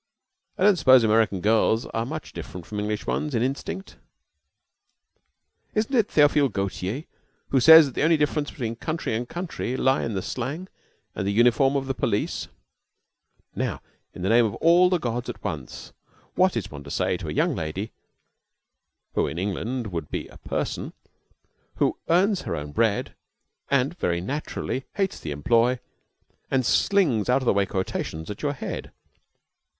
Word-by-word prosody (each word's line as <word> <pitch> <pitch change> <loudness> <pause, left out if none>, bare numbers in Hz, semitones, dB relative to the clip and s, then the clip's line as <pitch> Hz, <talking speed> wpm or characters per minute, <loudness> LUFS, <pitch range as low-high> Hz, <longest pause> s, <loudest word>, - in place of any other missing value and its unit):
"I - - 0
don't 205 -2 +6
suppose 130 -5 +6
American 110 -3 +2
girls 110 +2 +3
are 115 +1 -3
much 155 +2 -6
different 90 -3 -8
from 105 - -5
English 105 0 -2
ones 150 -4 -1
in 115 - +2
instinct." 140 +8 -4 1.8
"Isn't 220 +5 0
it 225 -4 +3
Theophile 145 -2 +4
Gautier 100 +5 -3 0.5
who 135 - +3
says 160 +4 +9
that 135 - -6
the - - -2
only 160 +1 +4
difference 150 0 0
between 115 -4 -4
country 155 -1 -3
and 120 +2 -3
country 170 -8 -4
lie 130 +1 +2
in 115 - -3
the 95 - -2
slang 145 +10 -4 0.4
and 95 - -3
the - - +1
uniform 120 +5 +4
of 135 -1 0
the 135 - -1
police?" - - -1 1.1
Now, - - -2 0.3
in 90 - -8
the 95 - +1
name 120 +2 +6
of 110 -3 -1
all 175 +2 +5
the 180 - +2
gods 120 -5 -3
at - - -7
once, 80 -10 -6 0.4
what 185 -4 +3
is 100 -3 -4
one 70 -1 -8
to - - -9
say - - 0
to - - -7
a - - -3
young - - +1
lady 85 +7 -4 1.2
(who - - +1
in 80 - -5
England 105 +5 -3
would 85 -4 -4
be - - -4
a - - -14
person) - - -3 0.8
who - - 0
earns 185 +3 +3
her - - -3
own 75 0 -6
bread, 110 +4 0 0.6
and 140 +4 +1
very 85 -1 0
naturally 135 +4 -4
hates 195 -2 -1
the 80 - -6
employ, 115 - +2 0.7
and 130 -2 +1
slings 135 - +2
out 130 +2 +3
of - - -5
the - - +4
way 100 -1 +1
quotations 95 -2 -3
at 105 - -8
your 145 -1 0
head? 135 - -6
125 Hz, 170 wpm, -25 LUFS, 105-150 Hz, 1.8 s, says